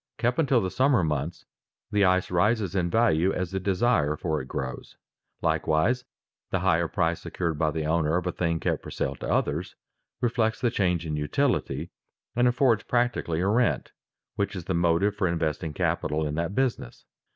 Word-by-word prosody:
Kept 120 +3 0
until 140 -6 +3
the 95 -2 -2
summer 130 -6 +3
months, 75 +2 -2 0.5
the 105 -2 +3
ice 95 -1 +2
rises 100 +1 +2
in 90 -3 0
value 95 -4 +3
as 90 -2 -3
the 95 - -1
desire 95 -5 +1
for 80 -2 -1
it 65 - -9
grows. 65 -1 -5 0.5
Likewise 115 +12 +1 0.4
the 95 - -1
higher 85 -2 +2
price 80 +1 0
secured 85 -4 -3
by 80 - +2
the 80 0 -3
owner 80 +1 +1
of 90 - -2
a 90 - 0
thing 85 -2 -1
kept - - -1
for - - -9
sale - - -2
to - - -5
others, - - -1 0.4
reflects 110 -2 0
the 120 - +1
change 90 -6 0
in 75 -1 -2
utility, 75 -1 -1 0.4
and 120 +1 +4
affords 125 -2 +3
practically 120 -9 0
a 95 - +1
rent 120 +4 +1 0.5
which 100 0 -1
is 90 -3 -6
the 95 - -1
motive 85 +4 +2
for 95 -3 +1
investing 80 -1 -1
capital 75 +1 -1
in 75 - -2
that 85 +5 -2
business. 130 - -2
90 Hz, 180 wpm, -26 LUFS, 80-110 Hz, 0.5 s, and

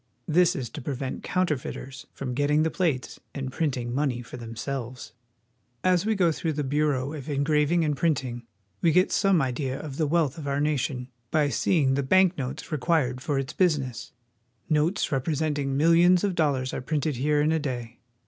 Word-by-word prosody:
This 175 +3 +4
is 130 -7 -3
to 150 - -7
prevent 130 0 -4
counterfeiters 140 -7 -3
from 130 -2 -5
getting 145 +3 +2
the 160 - 0
plates 155 -9 -1 0.2
and 135 -2 -4
printing 125 -6 -2
money 130 -3 -1
for 120 - -10
themselves. 120 +2 -6 0.7
As 185 +2 +2
we 220 - +2
go 180 -4 +3
through 160 0 -2
the 150 0 -2
Bureau 140 -1 0
of 150 -2 -7
Engraving 150 +3 +2
and 150 -1 0
Print 155 -2 +1
ing 120 -1 -7 0.3
we 165 - +4
get 180 +4 +3
some 190 -6 +3
idea 130 +1 -2
of 145 -3 -7
the 155 - +1
wealth 160 -2 +1
of 145 - -6
our 140 0 0
nation 135 -4 -1 0.2
by 150 0 +2
seeing 140 -2 +2
the 140 - +1
bank 185 +6 +4
notes 135 +2 -5
required 140 -4 +1
for 145 0 -1
its 135 +1 -3
business. 145 -10 0 0.6
Notes 155 +5 +1
represent 150 +2 0
ing 135 -1 -1
millions 170 +4 +5
of 200 -2 +1
dollars 140 -6 0
are - - -3
printed 150 0 -1
here 150 +3 +2
in 150 +2 +2
a 160 - +2
day. 120 -5 -5
145 Hz, 185 wpm, -26 LUFS, 130-160 Hz, 0.7 s, millions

